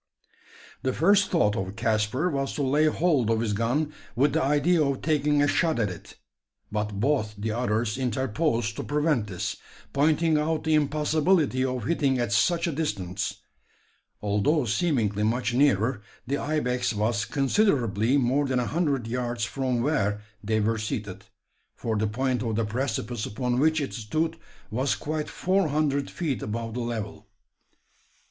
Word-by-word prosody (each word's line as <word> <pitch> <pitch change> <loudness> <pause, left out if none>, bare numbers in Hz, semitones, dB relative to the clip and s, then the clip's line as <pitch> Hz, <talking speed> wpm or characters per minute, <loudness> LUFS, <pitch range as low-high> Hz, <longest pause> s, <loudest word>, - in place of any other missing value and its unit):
The 130 - 0
first 200 +6 +4
thought 105 - +2
of 95 +1 -3
Caspar 115 +8 0
was 135 -1 -2
to 145 - -1
lay 145 +4 +3
hold 150 -7 +2
of 115 -1 +2
his 110 -2 0
gun 130 +8 0 0.2
with 140 +5 +3
the - - +2
idea 150 +4 +3
of 140 -2 -1
taking 150 -2 +2
a - - +3
shot 160 +2 +1
at 105 -5 0
it; 90 - -11 0.5
but 105 -1 -2
both 110 -4 0
the 110 +2 -2
others 115 0 -1
interposed 125 -1 0
to - - -3
prevent 145 -6 +1
this 90 -3 -4 0.4
pointing 155 +2 +3
out 155 +1 -1
the 160 - +1
impossibility 150 -1 +2
of 130 -3 -2
hitting 140 -1 +1
at 120 -4 -1
such 170 - +2
a 170 - 0
distance. 100 - -3 0.8
Although 105 +9 +2
seemingly 115 - 0
much 120 +3 0
nearer, 125 -4 +2 0.2
the 140 +3 -1
ibex 125 -5 0
was 110 +2 0
considerably 135 - +2
more 135 +2 +2
than 130 -1 0
a 125 - 0
hundred 145 -5 0
yards 120 0 -2
from 130 -3 -1
where 105 -9 0 0.2
they 110 +1 +1
were 110 +1 +1
seated: 105 -2 -4 0.5
for 115 -1 -2
the 110 +1 +1
point 125 +2 -1
of 115 -2 -1
the 115 0 +1
precipice 115 -1 -2
upon 125 +3 -1
which 160 +2 +3
it 140 - -3
stood 155 +9 -2 0.3
was 130 +5 +1
quite 155 0 -3
four 190 -1 +1
hundred 145 -2 0
feet 145 - -3
above 115 +1 -4
the 125 - -3
level. 115 -3 -4
130 Hz, 160 wpm, -26 LUFS, 110-150 Hz, 0.8 s, first